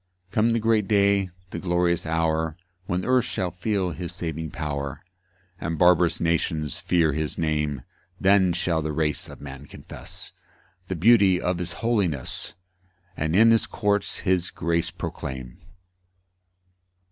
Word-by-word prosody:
4 - - -35
Come 115 +2 +3
the 115 - +2
great 110 -2 +2
day, 100 -2 +3 0.2
the - - -4
glorious 85 -2 +1
hour, 80 0 0 0.3
When 90 +1 -1
earth 125 -1 +3
shall 95 -4 -2
feel 95 0 -1
his 85 +1 -5
saving 80 -2 -4
power, 70 -3 -4 0.6
And 80 -1 -3
barbarous 90 -1 +4
nations 80 -3 0
fear 85 -4 +2
his 75 0 -2
name; 75 -4 -1 0.4
Then 95 -1 +4
shall 85 -2 0
the 75 0 -3
race 75 -1 -1
of - - -11
man 70 0 -9
confess - - -8 0.6
The 95 - -2
beauty 95 0 +5
of 90 -1 -1
his 90 - -3
holiness, 90 - -1 0.6
And 80 +2 -1
in 115 +3 +7
his 115 - +3
courts 105 -2 -1
his 90 -3 +1
grace 85 0 -1
proclaim. 65 -2 -6
85 Hz, 140 wpm, -25 LUFS, 80-95 Hz, 0.6 s, in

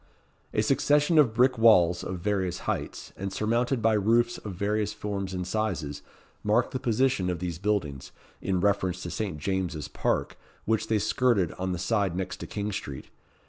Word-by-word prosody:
A - - +1
succession 150 +2 +3
of 120 -7 +4
brick 125 0 +3
walls, 90 -7 +5
of 90 - -4
various 95 -2 -1
heights, - - -4
and 100 0 -4
surmounted 115 +4 0
by 115 0 +4
roofs 115 +3 +2
of 100 -4 -7
various 105 +2 -1
forms 100 -2 -4
and 90 -1 -3
sizes, 90 -8 -2 0.4
marked 110 +3 +2
the 130 - -2
position 120 -6 +1
of 90 - -1
these 85 -1 -4
buildings, 95 -10 -2 0.3
in 95 -2 0
reference 95 -2 +1
to 85 - -5
Saint 95 -3 -3
James's 85 -3 -2
Park, - - -1 0.3
which 110 0 0
they 110 - +2
skirted 105 -3 +2
on 95 0 -3
the 90 - -2
side 100 -1 0
next 90 -1 -3
to - - -7
King 105 0 -3
Street. 70 -9 -6
100 Hz, 175 wpm, -27 LUFS, 90-110 Hz, 0.4 s, walls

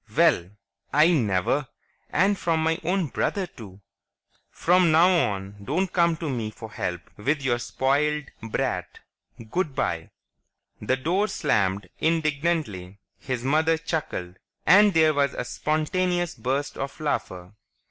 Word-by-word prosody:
"Well! 85 +1 +4 0.4
I 155 +4 +5
never! 120 - +1 0.4
And 195 +4 +3
from 165 -4 0
my 160 0 +1
own 180 +2 +1
brother, 195 +7 -1
too. 100 - -13 0.7
From 180 -1 +3
now 165 +3 +6 0.2
on 100 +1 -7
don't 180 - -1
come 170 -2 +3
to 165 - -4
me 120 -6 -2
for 110 0 -10
help 90 -4 -3 0.2
with 140 +7 -1
your 120 -3 +1
spoiled 145 +4 0
brat. 115 -1 -3 0.5
Good 175 -7 -1
bye!" 80 -1 -2 0.7
The 130 +5 0
door 180 +10 +1
slammed 100 - 0
indignantly, 155 - -1 0.2
his 130 -2 -4
mother 160 +4 +2
chuckled, 150 - -4 0.3
and 205 +2 +7
there 160 -1 +5
was 140 -2 +1
a - - -3
spontaneous 175 +3 -1
burst 135 +3 -3
of 135 +1 -5
laughter. 95 -12 -3
150 Hz, 130 wpm, -25 LUFS, 110-165 Hz, 0.7 s, and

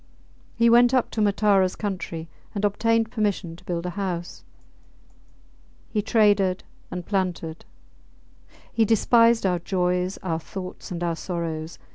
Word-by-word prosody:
He 235 0 +3
went 240 +2 +6
up 255 - +1
to 220 - -1
Mataras 200 -2 +3
country 180 -5 -4 0.3
and 205 +1 0
obtained 225 +2 +1
permission 205 -7 -1
to 170 - -17
build 170 -1 -3
a 180 - -2
house. 175 -3 -4 1.5
He 215 - +1
traded 205 -4 +3 0.3
and 180 -1 -5
planted. 180 -5 -2 1.1
He 230 - +3
despised 230 +1 +4
our 180 -2 +2
joys, 180 +1 0
our 165 -3 -1
thoughts, 185 +2 -8
and 175 -1 -4
our 170 -1 0
sorrows. 165 -2 -4
190 Hz, 130 wpm, -24 LUFS, 175-215 Hz, 1.5 s, went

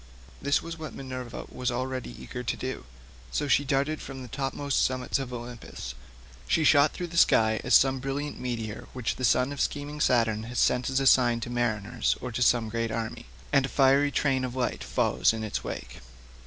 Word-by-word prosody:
This 140 +1 +1
was 165 0 -7
what 155 - -7
Minerva 130 -3 -6
was 125 0 -2
already 130 +1 -4
eager 125 - -6
to 125 - -2
do, 130 - -5 0.5
so 145 - -1
down - - -4
she 145 - +4
darted 140 +2 0
from 135 -1 -7
the - - -8
topmost 135 +1 -1
summits 130 +1 0
of 130 -2 -5
Olympus. 120 - -7 0.5
She 160 - +2
shot 145 -1 +6
through 180 - -5
the 170 0 -6
sky 110 -1 +4
as 125 - +4
some 135 0 +5
brilliant 140 +3 -4
meteor 115 -4 -4
which 125 -3 -2
the 130 - -5
son 125 +3 +3
of 140 - -4
scheming 145 +1 -2
Saturn 115 -5 +2
has 120 +1 -6
sent 125 0 +2
as 135 0 +1
a 135 - 0
sign 120 -3 +5
to 120 - -5
mariners 120 -1 0
or 125 - -5
to 115 - -3
some 120 -1 +4
great 115 +1 -1
army, 110 - -4 0.3
and 135 - +5
a - - -10
fiery 140 +1 +4
train 135 -2 +1
of 125 -1 -4
light 125 -2 -1
follows - - +2
in 110 -1 -4
its 110 - -3
wake. - - -6
130 Hz, 205 wpm, -28 LUFS, 120-135 Hz, 0.5 s, shot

